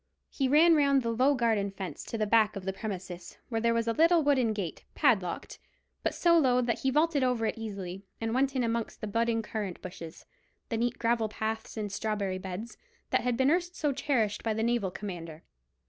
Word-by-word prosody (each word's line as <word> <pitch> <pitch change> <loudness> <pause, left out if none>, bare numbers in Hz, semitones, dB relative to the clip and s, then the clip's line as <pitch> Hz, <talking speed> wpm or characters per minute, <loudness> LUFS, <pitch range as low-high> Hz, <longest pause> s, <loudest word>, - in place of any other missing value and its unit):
He 270 - 0
ran 315 +5 +6
round 280 -3 +3
the 230 - 0
low 260 +5 +3
garden 225 -5 +1
fence 195 -2 -6
to 230 - -4
the 215 - +1
back 215 0 +3
of 195 -2 -6
the 190 - -1
premises, 185 -4 -6
where 225 -2 -1
there 230 0 +2
was 230 0 0
a 230 - +2
little 330 +3 +4
wooden 260 -6 +3
gate, 200 -6 -4
padlocked, 210 - +1 0.4
but - - -1
so 340 -1 +4
low 250 -4 +3
that 240 -2 0
he 265 - +1
vaulted 300 0 +2
over 250 -3 +1
it - - -1
easily, 195 -4 -6 0.2
and 225 0 -2
went 270 +2 +1
in 255 - +1
amongst 230 -1 -2
the - - -2
budding 230 +2 0
currant 210 -4 -4
bushes, 175 -3 -9 0.4
the 230 - -1
neat 240 +1 0
gravel 230 -1 +1
paths 220 +2 -4
and 210 -2 -3
strawberry 200 -2 -2
beds, 190 +5 -6 0.3
that - - +3
had 245 -2 0
been 265 +2 +3
erst 350 +1 0
so 295 -2 0
cherished 230 -7 0
by 220 -2 -1
the 220 - -1
naval 235 -4 +1
commander. 170 -5 -7
225 Hz, 210 wpm, -29 LUFS, 200-255 Hz, 0.4 s, ran